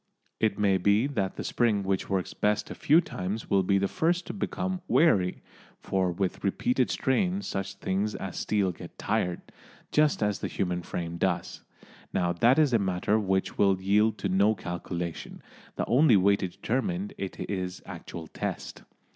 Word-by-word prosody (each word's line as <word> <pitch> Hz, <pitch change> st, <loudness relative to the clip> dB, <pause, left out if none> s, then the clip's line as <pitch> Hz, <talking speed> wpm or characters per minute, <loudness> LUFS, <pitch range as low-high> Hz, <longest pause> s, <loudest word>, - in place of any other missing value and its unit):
It 110 Hz, -2 st, +1 dB
may 100 Hz, -2 st, +3 dB
be 100 Hz, +5 st, +3 dB
that 105 Hz, -10 st, -2 dB
the -, -, -5 dB
spring 110 Hz, -4 st, +1 dB
which 95 Hz, -1 st, -1 dB
works 95 Hz, -2 st, -1 dB
best 105 Hz, 0 st, 0 dB
a -, -, -3 dB
few 155 Hz, +4 st, +4 dB
times 100 Hz, -, -5 dB
will 100 Hz, -, +5 dB
be 100 Hz, +1 st, +2 dB
the 100 Hz, 0 st, +1 dB
first 175 Hz, -, 0 dB
to -, -, -5 dB
become 185 Hz, -2 st, -3 dB
"weary," 95 Hz, -, +3 dB, 0.4 s
for 95 Hz, -2 st, 0 dB
with 90 Hz, +1 st, -2 dB
repeated 125 Hz, +5 st, +1 dB
strain 180 Hz, +9 st, 0 dB
such 95 Hz, 0 st, -4 dB
things 100 Hz, +2 st, -1 dB
as 95 Hz, -2 st, -5 dB
steel 100 Hz, -3 st, 0 dB
get 85 Hz, -, -11 dB
tired, 90 Hz, -1 st, -1 dB, 0.5 s
just 150 Hz, -6 st, +3 dB
as 105 Hz, -1 st, 0 dB
the -, -, -2 dB
human 90 Hz, -2 st, -2 dB
frame 85 Hz, 0 st, -5 dB
does. 90 Hz, 0 st, -1 dB, 0.5 s
Now 90 Hz, -1 st, +1 dB
that 120 Hz, +9 st, +4 dB
is 150 Hz, -5 st, +4 dB
a 115 Hz, -, +4 dB
matter 95 Hz, +2 st, +1 dB
which 95 Hz, -2 st, -1 dB
will 95 Hz, -2 st, +4 dB
yield 105 Hz, +3 st, +2 dB
to -, -, -2 dB
no 100 Hz, +3 st, +3 dB
calculation, 85 Hz, -2 st, -5 dB, 0.3 s
the -, -, -1 dB
only 125 Hz, -2 st, +5 dB
way 100 Hz, +2 st, +4 dB
to 95 Hz, -, -2 dB
determine 175 Hz, -, -2 dB
it 95 Hz, -, -5 dB
is 90 Hz, -2 st, -4 dB
actual 85 Hz, -1 st, -8 dB
test. -, -, -5 dB
100 Hz, 170 wpm, -28 LUFS, 95-115 Hz, 0.5 s, will